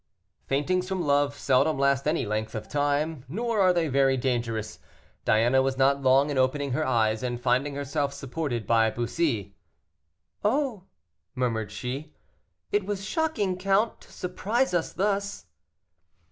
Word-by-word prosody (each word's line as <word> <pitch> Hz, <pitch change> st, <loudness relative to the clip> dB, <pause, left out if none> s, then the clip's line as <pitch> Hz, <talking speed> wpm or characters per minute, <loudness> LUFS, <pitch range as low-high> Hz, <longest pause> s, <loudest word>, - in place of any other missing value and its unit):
Faintings 180 Hz, +7 st, 0 dB
from 190 Hz, -2 st, -1 dB
love 145 Hz, -1 st, +2 dB
seldom 140 Hz, +3 st, +2 dB
last 140 Hz, 0 st, +2 dB
any 155 Hz, -4 st, +1 dB
length 110 Hz, +1 st, -3 dB
of 110 Hz, -, -5 dB
time, 145 Hz, 0 st, 0 dB
nor 225 Hz, -, 0 dB
are 185 Hz, -1 st, +5 dB
they 170 Hz, -2 st, +1 dB
very 135 Hz, -1 st, +3 dB
dangerous. 115 Hz, -4 st, -2 dB, 0.5 s
Diana 120 Hz, +5 st, +4 dB
was 135 Hz, 0 st, -1 dB
not 140 Hz, +1 st, +3 dB
long 135 Hz, +2 st, +4 dB
in 135 Hz, -, 0 dB
opening 140 Hz, +2 st, +1 dB
her 155 Hz, +5 st, 0 dB
eyes, 110 Hz, -5 st, +1 dB
and 120 Hz, -1 st, -3 dB
finding 130 Hz, +3 st, +1 dB
herself 140 Hz, 0 st, -1 dB
supported 135 Hz, -4 st, -4 dB
by 115 Hz, +1 st, +3 dB
Bussy. 120 Hz, -, -1 dB, 0.9 s
"Oh!" 225 Hz, -3 st, 0 dB, 0.5 s
murmured 115 Hz, -4 st, -1 dB
she, 130 Hz, +8 st, -6 dB, 0.6 s
"it 205 Hz, 0 st, +2 dB
was 195 Hz, 0 st, -4 dB
shocking, 210 Hz, -, -1 dB
count, 195 Hz, +4 st, +1 dB
to -, -, -17 dB
surprise 205 Hz, +6 st, -1 dB
us 175 Hz, -2 st, 0 dB
thus." 200 Hz, +1 st, -1 dB
140 Hz, 145 wpm, -27 LUFS, 125-180 Hz, 0.9 s, are